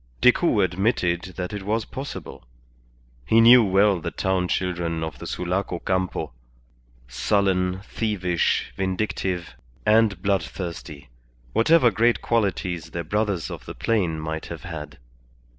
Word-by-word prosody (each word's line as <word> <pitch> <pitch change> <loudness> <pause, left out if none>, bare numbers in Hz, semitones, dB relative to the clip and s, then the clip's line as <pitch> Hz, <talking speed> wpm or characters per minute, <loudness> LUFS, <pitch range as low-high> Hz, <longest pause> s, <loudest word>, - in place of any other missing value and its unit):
Decoud 125 - +4
admitted 90 -2 0
that 90 +1 -4
it 105 - -4
was 110 +3 -1
possible. 135 +2 -7 0.8
He 110 - +4
knew 120 +1 +8
well 100 -2 +3
the - - -3
town 95 -1 0
children 85 -3 -1
of 80 - -6
the - - -7
Sulaco 90 0 -2
Campo: 95 -7 -2 0.7
sullen, 95 - +1
thievish, 95 -6 -1
vindictive, 95 -2 -2 0.3
and 110 -3 +4
bloodthirsty, 85 -6 -3 0.4
whatever 125 0 +5
great 120 +2 +2
qualities 95 -7 -1
their 85 - -4
brothers 100 0 -1
of - - -8
the - - -7
plain 90 -9 0
might 80 0 -4
have - - -8
had. - - -7
95 Hz, 125 wpm, -24 LUFS, 85-105 Hz, 0.8 s, knew